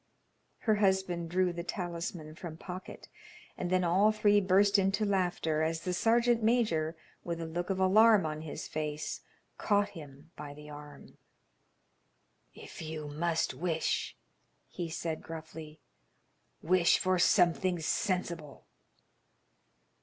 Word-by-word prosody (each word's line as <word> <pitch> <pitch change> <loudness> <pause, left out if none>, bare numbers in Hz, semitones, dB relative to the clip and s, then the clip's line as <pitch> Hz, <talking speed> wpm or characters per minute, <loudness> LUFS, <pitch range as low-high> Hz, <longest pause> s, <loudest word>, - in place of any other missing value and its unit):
Her 215 -2 +2
husband 190 -4 +1
drew 180 0 +1
the 170 0 -5
talisman 170 -3 -5
from 160 -1 -8
pocket, 180 +2 -9 0.5
and 175 - -3
then 185 0 +2
all 190 +5 +4
three 205 -1 +3
burst 200 +2 +4
into 195 +2 +1
laughter 180 -5 0
as 160 +1 -1
the 180 - -2
sergeant 235 +5 +3
major, 210 -9 +1 0.3
with 170 -1 -4
a 165 - -4
look 175 +3 -4
of 190 -1 -1
alarm 210 +1 +5
on 155 0 -3
his 155 -2 -6
face, 150 0 -4 0.4
caught 205 -1 +2
him 150 -1 -12
by 145 -1 -8
the 150 0 -11
arm. 145 0 -12 1.4
"If - - -10
you 155 -2 -6
must 165 +2 -1
wish," 165 -2 -2 0.5
he 175 -2 -4
said, 160 -1 -4
gruffly, 160 -1 -9 0.8
"wish 175 +1 +4
for 185 -1 +1
something 175 0 +3
sensible." 165 -3 -2
175 Hz, 125 wpm, -31 LUFS, 160-190 Hz, 1.4 s, alarm